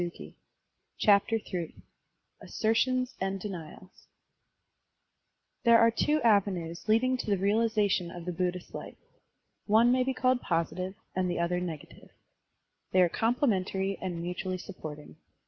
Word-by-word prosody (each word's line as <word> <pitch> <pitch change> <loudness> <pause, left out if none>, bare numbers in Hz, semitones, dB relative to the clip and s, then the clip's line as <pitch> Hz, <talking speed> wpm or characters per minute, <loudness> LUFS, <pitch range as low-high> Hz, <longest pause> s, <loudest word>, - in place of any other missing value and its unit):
Digitized 175 -1 -6 0.7
by 200 -2 +7 0.2
Google 175 -5 -5 0.7
ASSERTIONS 255 +3 0
AND 195 0 -1
DENIALS 185 -2 -9 1.6
THERE 235 -2 +7
are 230 0 +5
two 295 +6 +1
avenues 190 -6 +1
leading 255 +4 +3
to - - -5
the 200 - +2
realization 205 -2 +1
of 170 0 -9
the 180 - -2
Buddhist 180 0 -3
life; - - -8 0.7
one 225 +3 +5
may 255 0 +3
be 265 0 -2
called 255 0 +2
positive 180 +3 -2 0.2
and 185 -1 0
the 175 - -2
other 170 +1 0
negative. 165 -5 -7 0.8
They 185 -1 +5
are 175 - +3
complementary 195 - 0
and 175 -3 -4
mutually 180 +1 -3
supporting. 155 -5 -9
190 Hz, 130 wpm, -29 LUFS, 180-225 Hz, 1.6 s, by